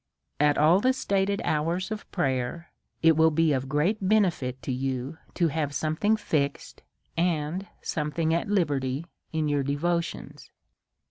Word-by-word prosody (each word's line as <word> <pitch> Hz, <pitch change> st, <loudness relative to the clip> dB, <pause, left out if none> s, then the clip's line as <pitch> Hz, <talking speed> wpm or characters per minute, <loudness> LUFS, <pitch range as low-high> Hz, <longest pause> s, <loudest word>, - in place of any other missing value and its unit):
At 145 Hz, 0 st, +3 dB
all 160 Hz, +5 st, +5 dB
the 255 Hz, +5 st, +3 dB
stated 200 Hz, -4 st, 0 dB
hours 170 Hz, +6 st, 0 dB
of 215 Hz, -1 st, -6 dB
prayer 135 Hz, 0 st, -2 dB, 0.3 s
it 165 Hz, -1 st, +6 dB
will 160 Hz, +1 st, +5 dB
be 160 Hz, 0 st, +2 dB
of 135 Hz, 0 st, -2 dB
great 160 Hz, +9 st, +1 dB
benefit 185 Hz, -11 st, +1 dB
to -, -, -3 dB
you 130 Hz, +3 st, -3 dB, 0.2 s
to 170 Hz, -3 st, +2 dB
have 145 Hz, -2 st, -2 dB
something 160 Hz, +9 st, +1 dB
fixed, 145 Hz, -8 st, -2 dB, 0.3 s
and 170 Hz, +2 st, -1 dB, 0.2 s
some 150 Hz, -1 st, -2 dB
thing 160 Hz, +1 st, 0 dB
at 170 Hz, +5 st, -1 dB
liberty 145 Hz, -7 st, 0 dB, 0.3 s
in 155 Hz, -1 st, 0 dB
your 145 Hz, -1 st, +1 dB
devotions. 165 Hz, +5 st, -2 dB
160 Hz, 145 wpm, -27 LUFS, 145-180 Hz, 0.3 s, it